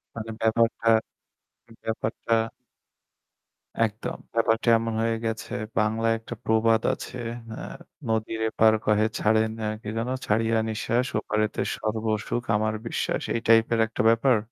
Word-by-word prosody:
মানে 115 0 -6
ব্যাপারটা, 115 0 +2 0.9
ব্যাপারটা 110 +1 -1 1.5
একদম 110 +1 -5 0.2
ব্যাপারটা 115 +1 +2
এমন 115 0 -2
হয়ে 115 0 +1
গেছে। 110 0 -3 0.3
বাংলায় 115 +1 +2
একটা 115 - -8
প্রবাদ 110 0 +3
আছে। - - -7 0.3
অ্যা - - -6 0.4
"নদীর 110 0 -1
এপার 110 0 +4
কহে 105 0 +3
ছাড়ে 110 +1 +3 0.2
না - - -4 0.2
কি - - -10
যেন 115 +2 -1 0.2
ছাড়িয়া 115 +1 +2
নিঃশ্বাস 115 +3 0
ওপারেতে 105 0 -1 0.2
সর্বসুখ 110 +1 -1
আমার 110 +1 +1
বিশ্বাস" - - -1
এই - - +1
টাইপের 115 0 +5
একটা 110 - -2
ব্যাপার? 115 +1 +4
110 Hz, 125 wpm, -26 LUFS, 110-115 Hz, 1.5 s, টাইপের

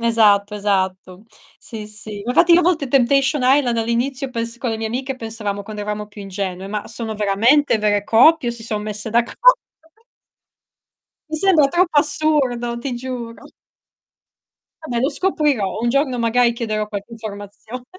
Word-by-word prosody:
Esatto, 210 -3 +3
esatto, 190 -1 -2 0.3
Sì, 215 -2 -9
sì. 210 -1 -8
Infatti, 335 +8 +4
io 345 - +7
a - - 0
volte 325 -4 +1
Temptation 270 +1 +2
Island 255 -2 +3
all'inizio 250 +4 -1
pens 230 -1 -4
con 240 -1 -3
le 220 - -2
mie 225 - -3
amiche, 260 +4 -4
pensavamo 215 -4 -5
quando 210 0 -7
eravamo 210 0 -4
più 205 0 -11
ingenue, 195 -1 -5
ma 210 0 -4
sono 225 -1 -6
veramente 225 +6 +3
vere 205 -1 +1
coppie 250 +4 +4
o - - -5
si 235 -1 -11
son 215 -2 -3
messe 210 +1 -5
d'accordo? 240 - +4 1.7
Mi 315 - -2
sembra 325 -4 +4
troppo 345 -1 +2
assurdo, 285 -6 0
ti 250 +1 -4
giuro. 240 -2 -7 1.3
Vabbè 240 -6 -3
lo 265 - +2
scoprirò. 290 - 0
Un 240 - 0
giorno 265 -1 +1
magari 235 +1 +2
chiederò 215 -2 -3
qualche 205 +2 -7
informazione. 215 +2 -9
235 Hz, 155 wpm, -20 LUFS, 210-265 Hz, 1.7 s, io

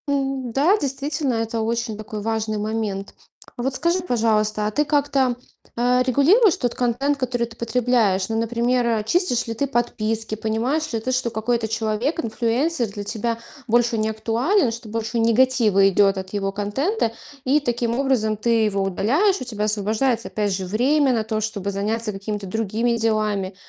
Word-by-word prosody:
М, 270 -3 -1
да, 305 - +3
действительно, 275 - -2
это 225 0 -2
очень 230 -1 -2
такой 215 0 -6
важный 220 0 -1
момент. 210 -2 -3 0.4
А 240 - -4
вот 265 +1 -1
скажи, 340 +5 +1
пожалуйста, 215 -7 +1
а - - -2
ты 295 +7 +1
как-то, 280 -4 +1 0.4
э, 250 +1 +3
регулируешь 320 - +4
тот 245 -2 -1
контент, 250 +4 0
который 245 -3 -1
ты 225 - -14
потребляешь? 230 -5 +1
Ну, 225 0 0
например, 240 +2 +1
э, 225 -2 +1
чистишь 245 - +1
ли 230 - -2
ты 280 +5 -1
подписки? 225 -3 -1
Понимаешь 230 +9 -1
ли 225 - 0
ты, 255 +4 -3
что 255 -1 0
какой-то 225 +1 -1
человек, 225 +7 -1
инфлюенсер 240 +4 0
для 205 0 -7
тебя 230 +2 -2 0.3
больше 235 0 +2
не 215 0 0
актуален, 230 - +1
что 230 -1 -8
больше 225 +2 -2
негатива 230 -4 +4
идет 195 +1 +3
от 190 +1 -6
его 195 -1 -1
контента, 225 - -1 0.3
и 275 +4 +4
таким 240 -3 -1
образом 235 -6 +1
ты 225 +1 +2
его 200 -2 0
удаляешь. 275 - +1
У - - -2
тебя 215 -4 -3
освобождается 220 +3 0
опять 205 -2 -1
же 190 0 -3
время 260 +8 +2
на 225 -2 0
то, 215 0 -2
чтобы 205 -2 -3
заняться 215 +3 -1
какими-то 205 0 -5
другими 225 +4 0
делами. 215 -4 0
230 Hz, 170 wpm, -22 LUFS, 215-255 Hz, 0.4 s, регулируешь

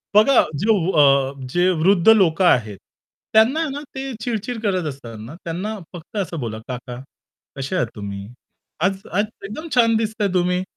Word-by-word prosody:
बघा 225 +5 +6 0.2
जे 205 - -1 0.3
अ, 140 -1 +4 0.2
जे 175 +1 +3
वृद्ध 190 +2 +4
लोकं 190 -5 +5
आहेत, 110 - +2 0.6
त्यांना 240 +9 +4
ना 280 +1 -5
ते 265 - -4 0.2
चिड-चिड 225 0 -3
करत 185 -6 0
असतात 120 -5 -9
ना. 115 +9 -9
त्यांना 190 +6 -4 0.2
फक्त 175 +5 -9
असं 175 -4 -2
बोला 110 -4 -4
"काका 125 -1 -6 0.6
कसे 135 +6 -3
आहात 175 - +1
तुम्ही? 100 -2 -6 0.6
आज 190 +2 +2
आज 205 +4 +1 0.2
एकदम 265 +12 -7
छान 230 -2 +4
दिसताय 220 -1 -1
तुम्ही, 180 0 +1
185 Hz, 155 wpm, -21 LUFS, 135-220 Hz, 0.6 s, बघा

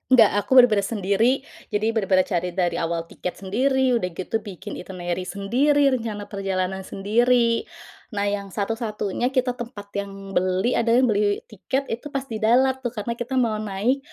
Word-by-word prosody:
Gak, 225 -4 +7
aku 205 +6 0
bener-bener 215 -6 +6
sendiri. 225 +5 +1 0.2
Jadi 215 +2 0
bener-bener 195 -4 +2
cari 180 -2 -2
dari 180 -2 0
awal 165 0 -1
tiket 180 +2 -6
sendiri, 260 +6 +2
udah 180 - -1
gitu 205 +5 -2
bikin 200 0 -8
itinerary 180 0 -4
sendiri, 275 +9 +2
rencana 225 -5 -2
perjalanan 190 -1 -2
sendiri. 230 +5 +1 0.5
Nah, 200 - 0
yang 205 -1 -1
satu-satunya 215 +4 -2
kita 255 0 +2
tempat 230 -5 -8
yang 195 -1 -7
beli, 185 +5 +1
ada 230 0 +3
yang 250 -2 +4
beli 205 0 +1
tiket 260 +7 -3
itu 235 +5 -4
pas 275 -2 -3
di 225 -5 -6
Dalat, 255 +4 +3
tuh. 250 -2 -4
Karena 235 +2 -4
kita 245 +2 -3
mau 230 -4 +1
naik 215 +6 0
215 Hz, 165 wpm, -23 LUFS, 195-245 Hz, 0.5 s, Gak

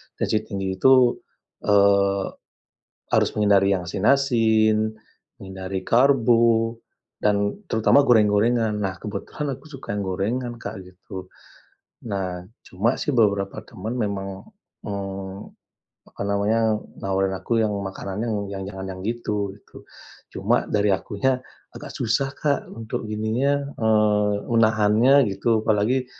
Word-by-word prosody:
tensi 110 - 0
tinggi 95 -2 -3
itu, 130 -1 +5 0.5
eee, 100 -1 +3 0.8
harus - - +3
menghindari 100 -2 +3
yang 90 - -4
asin-asin, 110 0 +2 0.4
menghindari 95 0 -6
karbo, 115 -3 +3 0.4
dan 100 - 0
terutama 110 +5 +4
goreng-gorengan. 110 0 +3
Nah, 95 -2 -2
kebetulan 140 +7 -4
aku 140 +4 -17
suka 135 -7 -8
yang - - -2
gorengan, 120 +6 -2
Kak, 115 - -7
gitu. 95 +1 -10 0.8
Nah, 90 -2 -3 0.2
cuma 110 +7 0
sih 145 -4 -1
beberapa 100 -3 +1
teman 110 +1 -6
memang, 100 - -4 0.3
eee, 95 -2 -5 0.7
apa - - -7
namanya, 105 +2 +1 0.2
nawarin 95 0 0
aku 115 -1 0
yang 110 - +1
makanannya 100 +2 -4
yang 95 -1 -5
jangan 95 -1 -7
yang 95 0 -7
gitu, 105 -4 -2
gitu. 100 - -16 0.5
Cuma - - +1
dari 105 -1 +1
akunya 105 +7 0 0.4
agak - - -9
susah, 130 +3 0
Kak, 145 -2 0
untuk 115 -1 -5
gininya, 130 +7 -1
eee, 105 -2 +2 0.2
menahannya 115 +4 +4
gitu, 110 +3 0
apalagi, 115 +5 +1
105 Hz, 115 wpm, -23 LUFS, 100-115 Hz, 0.8 s, itu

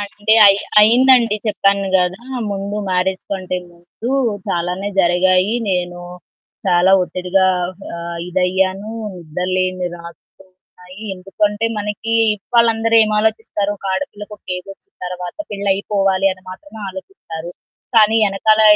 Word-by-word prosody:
అంటే 205 +2 0
అయి 195 0 +6 0.2
అయిందండి. 235 0 +5
చెప్పాను 200 -2 +1
గదా! 180 +4 -1 0.3
ముందు 200 +1 -4
మ్యారేజ్ 185 +1 -1
కంటే 185 -2 -3
ముందు 175 +7 -8 0.4
చాలానే 180 +3 -2
జరిగాయి. 185 +3 +3 0.2
నేను 175 -1 -2 0.7
చాలా 180 +1 +4
ఒత్తిడిగా 185 +1 0 0.5
ఆహ్, 170 0 -6
ఇదయ్యాను 190 +3 0 0.2
నిద్రలేని 180 +2 -2
రాత్రులున్నాయి. 185 +2 -16
ఎందుకంటే 205 +3 -1
మనకి 210 +2 -3 0.2
ఇవాళ 235 +3 +2
అందరూ 225 +1 +2
ఏమి 215 0 0
ఆలోచిస్తారు, 220 -2 -1
ఒక 195 - -9
ఆడపిల్లకి 210 -2 -6
ఒక - - -43
ఏజొచ్చిన 195 - -12
తరువాత 180 -1 -6
పెళ్లయిపోవాలి 195 -1 +1
అని 185 0 -15
మాత్రమే 220 +3 -11
ఆలోచిస్తారు. 175 - -9 0.5
కానీ 220 0 +6
ఎనకాల 215 +3 +3
195 Hz, 110 wpm, -18 LUFS, 180-210 Hz, 0.7 s, అయి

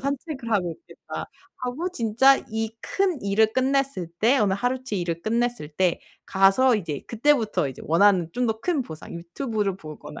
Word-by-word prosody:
'산책을 275 -2 -4
하고 185 -6 +1
있겠다.' 345 - -9 0.3
하고 255 +8 -3
진짜 245 +2 +4
이 220 0 -2
큰 375 -7 -1
일을 215 +2 +2
끝냈을 270 -7 0
때 245 +5 +4
오늘 200 -3 +2
하루치 245 -2 -2
일을 170 -1 -3
끝냈을 235 -6 -1
때 175 +3 0 0.2
가서 195 +7 +4
이제 160 -8 -4
그때부터 225 - +2
이제 130 - -9
원하는 175 0 +4
좀 245 0 0
더 220 0 -1
큰 320 -4 0
보상 160 -7 -10
유튜브를 200 +3 -3
보거나 155 -5 -10
220 Hz, 330 characters per minute, -24 LUFS, 190-260 Hz, 0.3 s, 진짜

